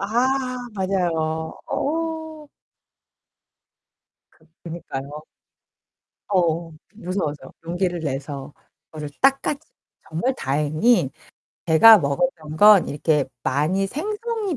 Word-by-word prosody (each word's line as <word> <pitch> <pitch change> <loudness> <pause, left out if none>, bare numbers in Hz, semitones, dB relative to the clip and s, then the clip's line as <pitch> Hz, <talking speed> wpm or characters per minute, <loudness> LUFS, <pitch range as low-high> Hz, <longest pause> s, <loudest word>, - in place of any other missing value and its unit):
아. 255 +3 0 0.2
맞아요. 165 -5 -1
어. 320 0 -3 1.8
그 160 - -27 0.2
그니까요. 150 -3 -7 1.1
어. 170 -3 0 0.2
무서워서 180 -7 -4
용기를 175 +1 -1
내서 140 -1 -5 0.3
그거를 150 -2 -8
딱 270 0 +4
까지 295 -1 -2 0.5
정말 240 +12 -1
다행히 150 - +1 0.6
제가 205 +7 +8
먹었던 155 - -2
건 210 0 +7
이렇게 150 0 +1 0.2
많이 160 +9 +1
생성이 415 - -3
175 Hz, 185 characters per minute, -22 LUFS, 155-255 Hz, 1.8 s, 제가